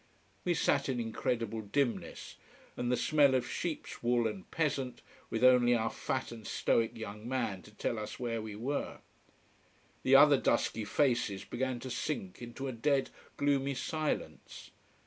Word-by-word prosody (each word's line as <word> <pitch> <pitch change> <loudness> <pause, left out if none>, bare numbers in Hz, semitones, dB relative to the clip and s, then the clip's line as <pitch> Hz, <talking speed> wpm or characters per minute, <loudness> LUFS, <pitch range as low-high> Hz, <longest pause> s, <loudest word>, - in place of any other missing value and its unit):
We 175 -1 +2
sat 140 -2 +2
in 125 -2 0
incredible 115 -1 -2
dimness, 120 +4 -2 0.4
and 125 0 -1
the 125 - +2
smell 145 -4 +4
of 125 -2 0
sheeps 160 +5 -4
wool 120 0 +2
and 190 - -6
peasant, 135 -6 -1 0.3
with 115 +2 -2
only 125 -1 +6
our 115 -1 0
fat 130 -2 -3
and 115 -2 -9
stoic 115 0 +1
young 105 +1 -7
man 115 -8 -1
to - - -15
tell 110 +1 -2
us 105 0 -6
where 115 -2 -2
we 110 -1 -6
were. 130 +7 -3 1.0
The 130 +1 +5
other 145 0 +8
dusky 115 -3 +1
faces 120 -6 +1
began 130 0 -2
to 130 - -6
sink 110 -12 -3
into 120 +3 -6
a - - -2
dead, 135 +3 +1 0.3
gloomy 140 -1 +1
silence. 155 +3 -3
125 Hz, 155 wpm, -32 LUFS, 115-140 Hz, 1.0 s, other